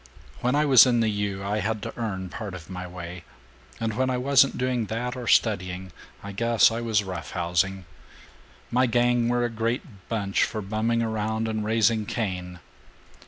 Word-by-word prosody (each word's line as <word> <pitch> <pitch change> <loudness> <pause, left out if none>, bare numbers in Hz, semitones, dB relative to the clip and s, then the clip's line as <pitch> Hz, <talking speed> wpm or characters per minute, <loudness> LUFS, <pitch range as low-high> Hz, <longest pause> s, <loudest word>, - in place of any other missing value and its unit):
When 125 +3 +1
I 150 +1 +3
was 135 -3 +8
in 120 -2 +3
the 110 -1 +2
U., 100 -1 -2
I 105 +2 0
had 110 0 -2
to - - -6
earn 95 -6 -4
part 100 0 -6
of 90 0 -10
my 90 0 -5
way, 90 0 -8 0.6
and 115 -1 -1
when 130 +2 +1
I 125 - 0
wasn't 135 +1 +4
doing 125 -3 -1
that 120 +3 -3
or 125 -2 -6
studying, 95 -5 +1 0.3
I 100 - -6
guess 115 +1 +3
I 115 +1 -3
was 110 -3 +1
roughhousing. 90 +1 -2 0.9
My 125 +2 +3
gang 120 0 +2
were 120 0 +1
a - - -1
great 115 - -4
bunch 100 -4 0
for 110 -2 -2
bumming 110 +3 0
around 110 0 -1
and 110 -1 -2
raising 110 0 +2
Cain. 90 -5 -3
110 Hz, 175 wpm, -25 LUFS, 95-120 Hz, 0.9 s, was